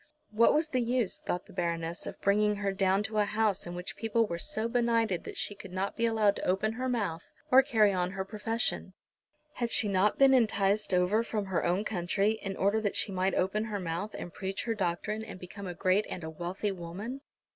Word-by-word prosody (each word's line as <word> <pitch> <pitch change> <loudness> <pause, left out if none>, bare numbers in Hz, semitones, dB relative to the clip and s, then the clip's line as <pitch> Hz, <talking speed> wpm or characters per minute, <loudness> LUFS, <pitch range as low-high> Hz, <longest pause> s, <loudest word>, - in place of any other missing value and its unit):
What 225 +2 +4
was 310 +1 +1
the 255 -4 +1
use, 240 -3 +1
thought 180 - -3
the - - -15
Baroness, 170 -1 -2
of - - -7
bringing 210 +1 +3
her 200 -1 -1
down 195 +1 +2
to 215 0 -2
a 210 - +4
house 210 -3 0
in 175 - -6
which 180 +1 -6
people 225 0 +1
were 170 -5 -4
so 230 -4 -1
benighted 230 -6 +1
that - - -7
she - - -1
could 195 -2 -11
not 190 +2 -2
be 230 - +1
allowed 215 -3 +2
to - - -5
open 195 +4 +1
her 255 +3 -3
mouth 200 -9 -2 0.2
or 260 +1 +9
carry 220 -6 +3
on 180 -1 0
her 190 0 -3
profession. 225 +3 -2 0.6
Had 235 -1 -2
she 225 - +2
not 200 +1 +2
been 270 -1 +6
enticed 210 -4 +2
over 180 +4 +3
from 215 -3 -2
her 190 -3 -1
own 180 +4 +1
country 195 +2 +1
in 195 -3 -5
order 200 +3 +2
that 205 -2 -1
she 200 0 0
might 190 0 0
open 210 +4 0
her 210 -2 -3
mouth, 180 +4 -4
and 175 - -7
preach 195 0 -3
her 230 - -1
doctrine, 210 +2 -2
and 185 - -9
become 190 +2 -8
a 175 - -5
great 190 +3 +2
and 175 - -6
a 160 - -5
wealthy 175 +5 -3
woman? 195 +9 -6
205 Hz, 220 wpm, -30 LUFS, 185-220 Hz, 0.6 s, or